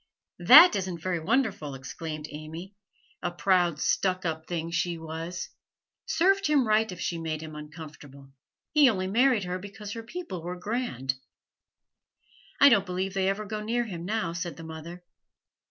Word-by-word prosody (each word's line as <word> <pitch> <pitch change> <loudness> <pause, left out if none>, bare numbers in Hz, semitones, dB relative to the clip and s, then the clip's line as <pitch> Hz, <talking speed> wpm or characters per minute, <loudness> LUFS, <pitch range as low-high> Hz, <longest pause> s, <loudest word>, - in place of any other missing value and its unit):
'That 355 +1 +9
isn't 185 -3 -3
very 175 +1 -2
wonderful,' 195 - 0
exclaimed 155 +3 -6
Amy. 160 +6 -8 0.5
'A 175 - -1
proud, 175 -3 +2
stuck 185 +1 0
up 160 -1 -3
thing, 165 -1 -3
she 170 0 -1
was! 165 +2 -6 0.6
Served 385 +4 +3
him 285 -5 +3
right 215 0 +2
if 180 - -8
she 170 -1 -2
made 160 -1 -4
him 155 -1 -8
uncomfortable; 150 -3 -11 0.4
he 295 -4 +6
only 185 -5 -1
married 235 +2 +3
her 180 0 -3
because 205 +2 -9
her 230 - -5
people 235 - -7
were 175 +2 -5
grand.' 180 - -2 1.5
'I 285 - +9
don't 200 -7 +4
believe 185 +1 -2
they 190 -1 +1
ever 205 +2 -2
go 210 +1 -4
near 235 +3 0
him 175 -6 -6
now,' 205 -3 -2
said 170 -2 -5
the 165 - -9
mother. 165 +2 -9
180 Hz, 160 wpm, -27 LUFS, 160-215 Hz, 1.5 s, That